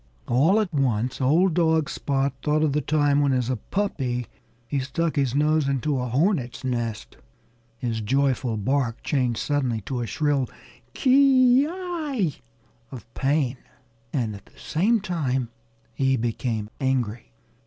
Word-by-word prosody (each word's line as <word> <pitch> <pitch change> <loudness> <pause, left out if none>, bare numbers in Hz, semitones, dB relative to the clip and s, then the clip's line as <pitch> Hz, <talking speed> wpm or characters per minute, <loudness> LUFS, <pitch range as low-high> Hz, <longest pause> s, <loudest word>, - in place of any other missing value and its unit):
All 155 - +4
at 200 -6 -2
once 125 -2 0
old 165 +7 +3
dog 160 -3 +2
Spot 140 -1 -1
thought 155 0 +1
of 150 -3 +1
the 150 - +1
time 145 0 +2
when, 140 -2 +2
as 125 -1 0
a - - 0
puppy, 130 - -2 0.4
he 140 - -1
stuck 150 +5 -1
his 135 -3 0
nose 150 0 +2
into 140 +1 0
a 125 - -2
hornet's 130 - 0
nest. 120 -4 -3 0.6
His 115 -2 -2
joyful 130 0 0
bark 125 +2 -1
changed 125 -5 0
suddenly 130 -6 -1
to 125 +4 -4
a 120 - -3
shrill 145 -3 0 0.5
ki 260 -1 +5
yi 315 - -2 0.5
of 115 -3 -11
pain. 135 -2 0 0.5
And 115 -7 -1
at 100 - -14
the - - -23
same 210 +8 +1
time 135 - -1 0.4
he 135 -1 +1
became 115 -2 -2
angry. 125 -4 -1
135 Hz, 145 wpm, -24 LUFS, 125-155 Hz, 0.6 s, ki